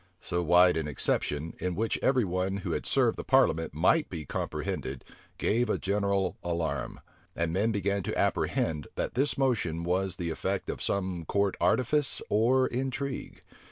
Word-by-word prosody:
So 85 -1 -2
wide 90 +1 +5
an 80 -2 -2
exception, 75 +1 0
in 90 -1 -2
which 110 +3 -1
every 130 -4 +3
one 95 +2 -1
who - - -1
had - - -2
served - - +2
the - - -3
parliament 80 +1 +3
might 120 - +3
be 80 -4 -6
comprehended, 65 - -4 0.3
gave 120 +2 +1
a - - +1
general 100 -1 0
alarm; 80 -6 -2 0.3
and 85 -1 -1
men 105 +5 +2
began 100 -1 0
to - - -3
apprehend, 75 -3 0
that - - -2
this 135 +1 +1
motion 105 - 0
was 95 +2 0
the 85 -3 -3
effect 80 - -2
of - - -7
some 95 -3 -1
court 100 +1 +1
artifice 130 - +2
or 125 +5 +4
intrigue. 135 +2 -4
95 Hz, 160 wpm, -29 LUFS, 85-115 Hz, 0.3 s, wide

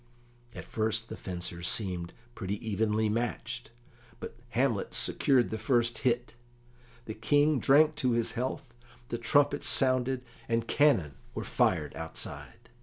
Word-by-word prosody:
At - - -7
first 110 +1 -2
the - - -5
fencers 85 -1 -5
seemed 90 -5 -1 0.2
pretty 100 -4 -3
evenly 110 +1 +1
matched, 120 +2 -3 0.5
but - - -7 0.2
Hamlet 125 -6 +1
secured 130 -3 +2
the 110 - -3
first 120 0 +1
hit. 120 -2 0 0.7
The 110 - -5
King 145 +6 +3
drank 150 +4 +5
to 130 -5 +1
his 115 -1 +1
health, 125 0 -4 0.4
the 120 - -3
trumpets 145 +4 +2
sounded, 130 -1 +2 0.3
and 115 0 0
cannon 100 - +3 0.2
were - - -3
fired - - +1
outside. - - -7
115 Hz, 130 wpm, -30 LUFS, 110-130 Hz, 0.7 s, drank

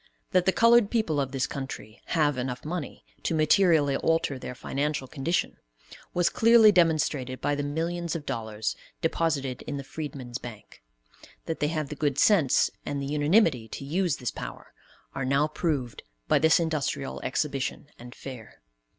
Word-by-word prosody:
That 185 0 +2
the - - +6
colored 230 0 +5
people 165 -11 +1
of 135 -1 -3
this 135 -1 0
country 135 -5 -7
have 150 -4 +2
enough 125 0 -4
money 160 -2 -5 0.2
to 165 - -1
materially 155 -3 +4
alter 165 -4 0
their 125 - -7
financial 140 +1 -2
condition, 155 +6 -1 0.5
was 175 -1 +2
clearly 230 -1 +6
demonstrated 150 -7 +1
by 145 - 0
the 145 - -1
millions 165 +4 -2
of 155 -3 -5
dollars 110 -1 -3 0.3
deposited 150 -6 -1
in 145 - -3
the 140 - -5
Freedmen's 135 -4 -6
Bank; 115 - -11 0.6
that 165 - -3
they 150 - +1
have 155 -2 -2
the 150 - -5
good 145 -2 0
sense, 170 -10 +4
and 145 - -3
the 140 - -3
unanimity 150 - +2
to 135 - -7
use 170 +1 0
this 125 - -3
power, - - -8 0.4
are 135 - -3
now 140 +3 +2
proved 150 -7 -2 0.3
by - - +4
this 160 +3 +5
industrial 150 -4 -2
exhibition 140 0 -2
and 120 +1 -11
fair. 125 -5 -10
145 Hz, 160 wpm, -27 LUFS, 135-165 Hz, 0.6 s, the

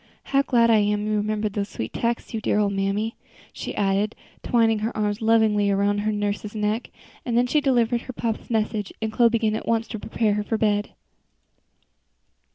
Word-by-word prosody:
How 275 - +5
glad 235 -4 +3
I 220 - +6
am 210 0 +1
you 215 0 0
remembered 210 0 -1
those 200 -1 -2
sweet 110 - -5
texts, 235 +1 -2
you 220 - -2
dear - - +1
old 205 -1 +2
mammy," 200 +3 -1 0.4
she - - -6
added, 200 +1 +1 0.3
twining 225 -2 +2
her 220 +2 -3
arms 210 +1 -1
lovingly 220 -2 +3
around 200 +1 +1
her 215 +1 0
nurse's 205 0 -3
neck. 215 +2 -1 0.3
And 235 -2 -1
then 245 - +4
she 295 +5 +2
delivered 240 -3 +2
her 255 - -8
papa's 230 -2 -3
message, 215 -2 -1
and 220 -1 -3
Chloe 235 +1 +5
began 225 -2 +1
at - - -5
once 230 0 +1
to 220 - -5
prepare 220 0 0
her 210 0 -1
for 225 +1 -1
bed. 205 -1 0
215 Hz, 190 wpm, -24 LUFS, 205-230 Hz, 0.4 s, I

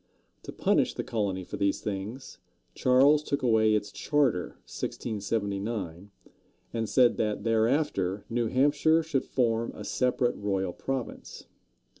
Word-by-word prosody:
To - - -8
punish - - +1
the - - -3
colony 100 -4 -2
for - - -7
these 100 0 +1
things, 105 +6 -6 0.3
Charles 135 +4 +4
took 140 -3 -3
away 110 -3 +4
its 105 -1 -2
charter 135 -11 0
(1679), 100 -3 -3 0.6
and 115 -2 -2
said 120 +3 +4
that 105 -2 -1
thereafter 110 - +1
New 120 0 0
Hampshire 145 +6 +3
should 150 -4 -1
form 115 -2 0
a - - -8
separate 125 -1 +1
royal 95 -3 -1
province. 135 -3 -5
115 Hz, 125 wpm, -28 LUFS, 100-130 Hz, 0.6 s, Charles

